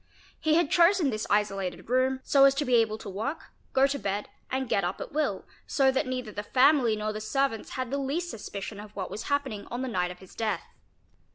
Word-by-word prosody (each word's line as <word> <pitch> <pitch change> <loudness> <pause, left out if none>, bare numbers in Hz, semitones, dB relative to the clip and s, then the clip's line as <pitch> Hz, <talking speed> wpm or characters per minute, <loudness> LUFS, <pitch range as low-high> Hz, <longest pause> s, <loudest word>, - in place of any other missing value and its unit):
He 315 0 +2
had 335 -3 +2
chosen 345 -4 +5
this 215 -1 -3
isolated 195 -3 0
room 260 +2 +2
so 275 -1 +6
as 275 0 +5
to 290 +1 0
be 250 - 0
able 225 -2 +3
to 220 - -10
work, 220 - -4 0.2
go 265 +1 +4
to 280 +1 -1
bed, 200 -1 -2 0.2
and 260 0 -1
get 200 - +1
up 175 +2 -2
at - - -6
will, 280 -10 -1 0.2
so 270 -1 +3
that 265 -1 0
neither 255 -4 -3
the 205 - -4
family 255 0 +4
nor 215 0 -2
the 215 - -5
servants 245 0 -1
had 255 -1 -3
the 280 - 0
least 310 +6 -2
suspicion 205 -1 -6
of 210 0 -11
what 190 -2 -4
was 210 +3 -5
happening 270 -8 -1
on 245 +2 -3
the - - -2
night 180 -7 0
of 180 - -8
his 190 0 -15
death. 215 -6 -1
245 Hz, 225 wpm, -28 LUFS, 210-275 Hz, 0.2 s, so